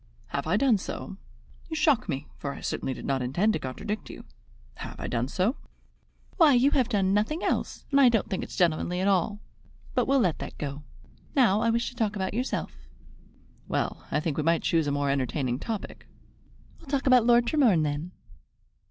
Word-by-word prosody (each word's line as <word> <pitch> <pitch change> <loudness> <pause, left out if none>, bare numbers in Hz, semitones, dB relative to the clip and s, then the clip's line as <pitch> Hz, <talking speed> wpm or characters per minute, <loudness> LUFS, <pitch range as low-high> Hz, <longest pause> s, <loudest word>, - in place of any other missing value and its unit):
"Have 140 - -3
I 180 - +2
done 235 -4 +3
so? 190 - -6 0.5
You 320 - -3
shock 300 - +2
me, 140 -1 -2
for 140 -1 -4
I - - -10
certainly 130 - -3
did - - -8
not 135 -1 0
intend 175 - +1
to - - -1
contradict 205 +11 -5
you." - - -10 2.1
"Why, 320 -6 +6
you 260 +4 +4
have 255 -5 +2
done 195 -4 +2
nothing 220 - 0
else, - - -2
and 280 0 +5
I 255 - +8
don't 225 -3 +1
think 190 - -2
it's - - -8
gentlemanly 175 +1 +1
at 190 - +1
all. 200 +2 +1 0.5
But - - +1
we'll 275 0 +4
let 175 -7 +1
that - - -7
go. 145 0 -5 0.5
Now 220 -7 +4
I 230 - +2
wish 235 +1 +1
to - - -15
talk 215 -3 -1
about 190 -1 -2
yourself." 250 +4 -2 0.9
"Well, - - -2
I - - +1
think 155 -2 -2
we 155 - 0
might 165 +1 +2
choose 165 -3 +2
a - - +1
more 140 0 0
entertaining 130 -2 -1
topic." 220 +2 -6 0.7
"We'll 290 - -15
talk 280 0 0
about 250 -3 +5
Lord 240 0 +5
Tremorne 235 - +3
then." 150 +3 -2
200 Hz, 185 wpm, -27 LUFS, 150-240 Hz, 2.1 s, I